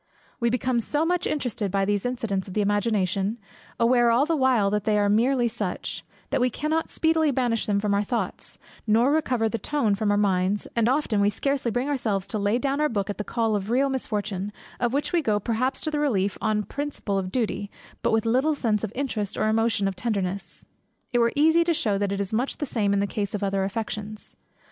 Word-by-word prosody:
We 235 -1 +2
become 250 0 0
so 295 +7 0
much 355 +1 0
interested 245 -8 -2
by 195 +1 +1
these 205 +3 0
incidents 220 -6 -2
of 185 - -8
the 210 - +2
imagination 205 0 0 0.4
(aware 240 0 +4
all 240 +5 +4
the 330 +1 +1
while 255 -8 +3
that 210 -1 0
they 210 0 +2
are 205 0 +2
merely 240 +4 +3
such) 215 -5 -4 0.3
that - - +1
we 250 - +3
cannot 310 +6 -1
speedily 320 -1 +2
banish 245 -4 0
them 200 -1 +2
from 205 0 0
our 200 - +2
thoughts, 230 +3 -3 0.3
nor 230 +5 +4
recover 255 -7 +1
the 230 +1 -2
tone 285 -8 0
of 200 - -1
our 205 - +3
minds; 195 0 +1
and 230 0 +3
often, 255 -6 +1
we 200 - +4
scarcely 270 +4 -1
bring 245 +4 -1
ourselves 220 -9 -1
to 215 - -2
lay 205 +3 +2
down 275 +3 -1
our 300 - +2
book 205 -2 -1
at 205 - -9
the - - -1
call 225 -1 0
of 200 0 -3
real 265 +4 +2
misfortune, 210 -6 -3 0.3
of 240 -1 +1
which 285 +7 -1
we 345 - +3
go 215 -7 +1
perhaps 240 +5 0
to 310 - -2
the 300 - -1
relief, 205 -10 +1
on 215 -1 +1
a - - -5
principle 275 -6 -3
of 185 -1 -4
duty, 220 -4 -1 0.3
but - - +1
with 220 0 +2
little 260 +7 +2
sense 220 -6 0
of 215 - -2
interest 245 -7 -2
or 215 - +1
emotion 220 -2 +2
of 195 - -2
tenderness. 195 -5 -3 0.5
It 245 - +3
were 235 0 +3
easy 320 +3 +5
to 335 -1 +2
shew 205 -8 +1
that 200 -1 0
it 200 - -2
is 200 +1 -3
much 245 +5 0
the 295 - -2
same 215 -6 0
in 200 - +2
the - - +1
case 200 0 -3
of 205 - -4
the - - +1
other 195 0 0
affections. 210 +1 -5
225 Hz, 230 wpm, -25 LUFS, 205-260 Hz, 0.5 s, easy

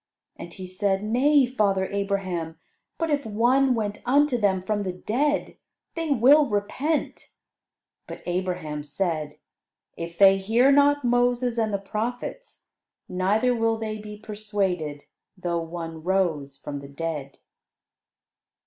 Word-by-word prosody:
And 170 - -9
he 185 +2 -8
said, 195 +1 -1
"Nay, 265 +6 +4
father 205 -6 +1
Abraham: 190 -5 -2 0.4
but 330 -2 -1
if 285 -1 +1
one 250 +4 +2
went 210 -2 -3
unto 285 +1 +3
them 200 -5 +2
from 205 +3 -2
the 190 -2 -2
dead, 275 +11 -1 0.4
they 330 -1 -3
will 280 +3 +6
repent." 260 +9 -2 0.8
But - - -9
Abraham 175 -4 -2
said, 155 -1 -3 0.6
"If 170 0 -7
they 195 -1 +7
hear 230 +7 +3
not 285 0 +4
Moses 245 0 +2
and 220 -1 +1
the 200 - +1
prophets, 230 - -5 0.4
neither 205 +7 +1
will 225 -1 +1
they 215 -1 -4
be 210 0 -9
persuaded, 200 -8 -3 0.3
though 175 -2 -2
one 165 -1 -6
rose 160 -6 0
from 145 0 -6
the 140 0 -10
dead." 145 -2 -5
205 Hz, 130 wpm, -25 LUFS, 180-245 Hz, 0.8 s, they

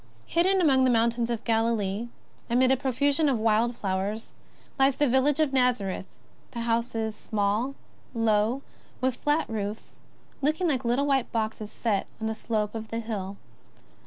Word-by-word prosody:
Hidden 375 +3 +2
among 270 -6 +4
the 260 - +4
mountains 235 0 +2
of 235 -1 -2
Galilee, 225 -2 0 0.4
amid 255 +2 +4
a - - +5
pro 265 0 -2
fusion 285 +4 +2
of 260 - +2
wild 225 +2 +2
flowers, 200 +2 -3 0.5
lies 270 0 +4
the 290 - +2
village 265 +4 +3
of 305 -3 +2
Xazareth, 245 -8 +1 0.4
the 235 - -5
houses, 230 -1 -1
small, 215 +6 -1 0.4
low, 225 +3 +2 0.4
with 260 -1 0
flat 295 +4 0
roofs, 210 -1 -5 0.4
looking 310 +6 +1
like 265 -5 0
little 245 +4 +1
white 270 -3 +1
boxes 220 -1 -2
set 210 -5 -1
on 220 - -3
the 220 - 0
slope 215 -1 -2
of 220 -1 -5
the 225 - -4
hill. 200 -4 -4
235 Hz, 160 wpm, -27 LUFS, 220-265 Hz, 0.5 s, a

